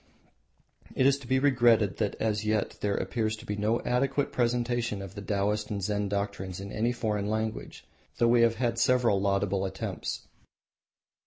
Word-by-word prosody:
It 130 Hz, -, +2 dB
is 140 Hz, 0 st, +4 dB
to 135 Hz, -, -12 dB
be 130 Hz, +1 st, +2 dB
regretted 120 Hz, -7 st, +3 dB
that 105 Hz, -3 st, -1 dB
as 110 Hz, -1 st, 0 dB
yet 110 Hz, -1 st, 0 dB
there 100 Hz, -1 st, 0 dB
appears 110 Hz, -2 st, -1 dB
to 110 Hz, -, -13 dB
be 105 Hz, -, -3 dB
no 105 Hz, +3 st, +1 dB
adequate 135 Hz, +3 st, 0 dB
presentation 120 Hz, -2 st, 0 dB
of 95 Hz, -1 st, -8 dB
the 100 Hz, -, -7 dB
Taoists 105 Hz, +1 st, -1 dB
and 100 Hz, -2 st, -3 dB
Zen 105 Hz, 0 st, -1 dB
doctrines 100 Hz, -2 st, -3 dB
in 100 Hz, +1 st, -7 dB
any 115 Hz, +3 st, 0 dB
foreign 105 Hz, -4 st, -2 dB
language, 110 Hz, 0 st, -3 dB, 0.3 s
though 120 Hz, -, +3 dB
we 120 Hz, 0 st, +5 dB
have 115 Hz, -1 st, +4 dB
had 115 Hz, -1 st, -1 dB
several 120 Hz, -4 st, +3 dB
laudable 100 Hz, -1 st, +1 dB
attempts. 95 Hz, 0 st, -4 dB
110 Hz, 170 wpm, -28 LUFS, 100-120 Hz, 0.3 s, we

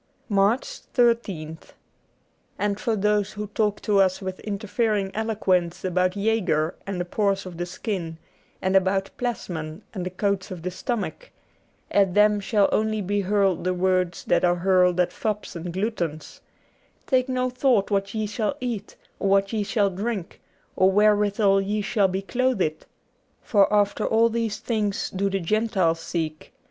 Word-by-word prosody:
78 205 Hz, -, -1 dB
MARCH 200 Hz, +6 st, +3 dB, 0.3 s
13th 200 Hz, -, +1 dB, 0.9 s
A 205 Hz, -, 0 dB
ND 200 Hz, 0 st, -3 dB
for 225 Hz, 0 st, 0 dB
those 210 Hz, 0 st, +1 dB
who 210 Hz, 0 st, -4 dB
talk 210 Hz, 0 st, -1 dB
to 205 Hz, -2 st, +2 dB
us 185 Hz, -1 st, +2 dB
with 190 Hz, -2 st, -5 dB
interfering 210 Hz, -1 st, -1 dB
J'\ -, -, -21 dB
eloquence 190 Hz, -6 st, 0 dB
about 185 Hz, 0 st, +1 dB
Jaeger 190 Hz, -7 st, +1 dB
and 195 Hz, -2 st, -3 dB
the 175 Hz, -, -1 dB
pores 195 Hz, +1 st, 0 dB
of 180 Hz, -2 st, -8 dB
the 175 Hz, 0 st, -3 dB
skin, 180 Hz, -3 st, -4 dB, 0.5 s
and 190 Hz, +1 st, +1 dB
about 195 Hz, +1 st, +2 dB
Plasmon 175 Hz, -8 st, -4 dB
and 190 Hz, -4 st, -4 dB
the 180 Hz, -, -3 dB
coats 195 Hz, +1 st, -1 dB
of 180 Hz, -3 st, -7 dB
the 180 Hz, -, -2 dB
stomach, 240 Hz, -, -4 dB, 0.6 s
at 195 Hz, -3 st, +3 dB
them 210 Hz, 0 st, +5 dB
shall 205 Hz, 0 st, +2 dB
only 215 Hz, 0 st, +1 dB
be 205 Hz, +1 st, 0 dB
hurled 195 Hz, -2 st, +1 dB
the 185 Hz, 0 st, 0 dB
words 185 Hz, -1 st, 0 dB
that -, -, +2 dB
are 175 Hz, 0 st, +4 dB
hurled 180 Hz, 0 st, +3 dB
at 180 Hz, -, +2 dB
fops 210 Hz, -4 st, -3 dB
and 170 Hz, +1 st, -5 dB
gluttons, 175 Hz, -5 st, -3 dB, 0.3 s
' -, -, -38 dB
Take 255 Hz, -1 st, +1 dB
no 255 Hz, 0 st, 0 dB
thought 250 Hz, -6 st, +2 dB
what 200 Hz, +1 st, 0 dB
ye 215 Hz, -1 st, 0 dB
shall 210 Hz, +5 st, -2 dB
eat, 240 Hz, -6 st, -4 dB, 0.2 s
or 195 Hz, -, 0 dB
what 195 Hz, +2 st, +2 dB
ye 220 Hz, -, 0 dB
shall 205 Hz, -1 st, +1 dB
drink, 200 Hz, -1 st, -4 dB, 0.3 s
or 190 Hz, 0 st, +4 dB
wherewithal 205 Hz, -1 st, +3 dB
ye 205 Hz, +2 st, -1 dB
shall 205 Hz, -1 st, +2 dB
be 190 Hz, +1 st, -3 dB
clothed. 220 Hz, -9 st, -1 dB, 0.6 s
For 200 Hz, -3 st, +3 dB
after 205 Hz, -1 st, +2 dB
all 230 Hz, +1 st, +4 dB
these 230 Hz, -2 st, -2 dB
things 210 Hz, -4 st, -2 dB
do 195 Hz, +1 st, 0 dB
the 195 Hz, 0 st, -1 dB
Gentiles 190 Hz, -3 st, +1 dB
seek. 160 Hz, -2 st, -4 dB
200 Hz, 170 wpm, -24 LUFS, 185-215 Hz, 0.9 s, them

